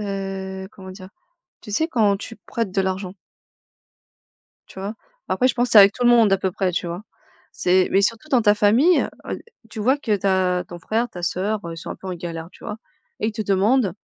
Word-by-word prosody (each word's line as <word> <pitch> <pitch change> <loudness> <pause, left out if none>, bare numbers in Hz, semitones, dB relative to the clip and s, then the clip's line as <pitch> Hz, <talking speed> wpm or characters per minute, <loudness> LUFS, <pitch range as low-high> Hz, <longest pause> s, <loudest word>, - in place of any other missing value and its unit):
heu, 195 -1 -5
comment 190 -1 -11
dire? 185 0 -11 0.5
Tu 210 - -11
sais? 315 +9 +1
Quand 215 -7 +2
tu 225 +3 -9
prêtes 225 0 -4
de 195 - +1
l'argent. 190 0 -2 1.6
Tu - - -11
vois? 200 +3 -5 0.3
Après, 255 - +2
je 250 - +1
pense 245 0 0
c'est 220 - +8
avec 200 0 +7
tout 245 - -3
le 240 - +6
monde 230 -4 +5
à - - +3
peu 190 -1 -1
près. 185 0 -1
Tu 175 - -2
vois? 175 +5 -5 0.5
C'est 185 +1 +2
mais 195 - +4
surtout 230 +7 -1
dans 255 -5 +4
ta 210 -2 +5
famille, 235 - +4
heu - - -3 0.2
heu, - - -3 0.3
tu 220 - -8
vois 260 +7 +3
que 220 -7 0
tu 200 0 -2
as 185 -1 +2
ton 175 - -8
frère, 225 +7 -1
ta 175 - -9
sœur, 205 +5 -1
heu, 170 - -5
ils - - -9
sont - - -8
un - - -5
peu 190 - -10
en 185 - -3
galère, 165 -1 -6
tu - - -18
vois 210 - -5 0.4
et - - 0
ils 225 - -1
te 215 - -4
demandent 205 +1 +2
200 Hz, 235 wpm, -22 LUFS, 185-225 Hz, 1.6 s, c'est